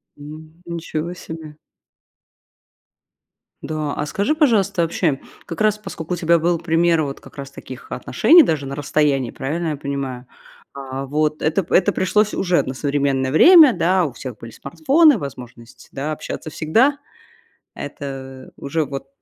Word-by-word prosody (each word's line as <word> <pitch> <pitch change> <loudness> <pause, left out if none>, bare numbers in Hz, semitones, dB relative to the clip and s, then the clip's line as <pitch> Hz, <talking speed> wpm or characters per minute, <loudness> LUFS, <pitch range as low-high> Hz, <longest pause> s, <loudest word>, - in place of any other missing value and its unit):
М, 155 +3 -12
ничего 170 0 -4
себе. 160 -3 -10 2.0
Да, 155 -2 -3
а 150 - -3
скажи 205 - -1
пожалуйста 205 - +2
вообще 165 -4 0 0.3
как 165 +2 -7
раз 215 -1 +3
поскольку 180 -5 -6
у - - -2
тебя 170 0 +3
был 170 0 0
пример 165 0 +2
вот 140 -2 -4
как - - -17
раз 140 -1 -7
таких 130 -1 -11
отношений 340 -1 +5
даже, 150 - -1
на 135 - -5
расстоянии, 145 -3 0
правильно 160 +5 -3
я 150 - -2
понимаю? 135 -3 -5 0.5
А, 135 0 -6
вот 150 +2 -1
это 160 +5 +1
п 170 - -1
это 195 +2 +4
пришлось 210 +3 +1
уже 180 -2 +2
на 130 - -6
современное 140 -2 0
время, 315 - +8
да, 180 +1 +2
у 145 - -4
всех 125 -2 -8
были 115 +1 -10
смартфоны, 300 - +3
возможность, 125 - -10
да, 140 +3 -4
общаться 155 +1 -6
всегда. 230 - +2 0.8
Это 135 -2 -8
уже 155 +3 -2
вот 135 -1 -7
155 Hz, 150 wpm, -20 LUFS, 140-180 Hz, 2.0 s, время